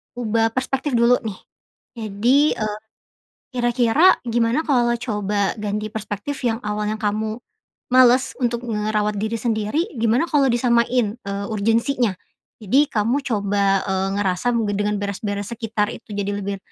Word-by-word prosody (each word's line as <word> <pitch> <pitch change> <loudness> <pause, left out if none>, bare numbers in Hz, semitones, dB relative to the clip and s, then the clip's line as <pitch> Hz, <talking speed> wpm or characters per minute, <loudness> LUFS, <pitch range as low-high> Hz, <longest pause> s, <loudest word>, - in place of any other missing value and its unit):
ubah 225 -1 +1
perspektif 265 +1 -1
dulu 235 +1 +4
nih. 205 -4 -5 0.6
Jadi, 230 +8 +2
eee, 215 -1 -3 0.8
kira-kira 240 +7 +3
gimana 235 +5 +1
kalau 240 -4 +2
coba 205 -4 -1
ganti 210 0 -3
perspektif 220 +5 -5
yang 225 -1 +1
awalnya 210 0 -2
kamu 215 +1 -1 0.6
males 255 0 +5
untuk 240 0 0
ngerawat 210 -1 -1
diri 220 +2 -2
sendiri, 230 - -1
gimana 230 +7 +2
kalau 285 -3 +3
disamain, 235 -1 +1
eee, 200 0 -4
urgency-nya. 230 +2 +1 0.5
Jadi 270 +9 +3
kamu 230 +6 +1
coba, 200 -4 +1
eee, 190 0 0
ngerasa 195 +5 0
mungkin 205 -3 0
dengan 210 0 0
beres-beres 205 0 -3
sekitar 220 -2 -1
itu - - -12
jadi 200 0 -2
lebih, 200 0 -2
220 Hz, 135 wpm, -21 LUFS, 205-245 Hz, 0.8 s, males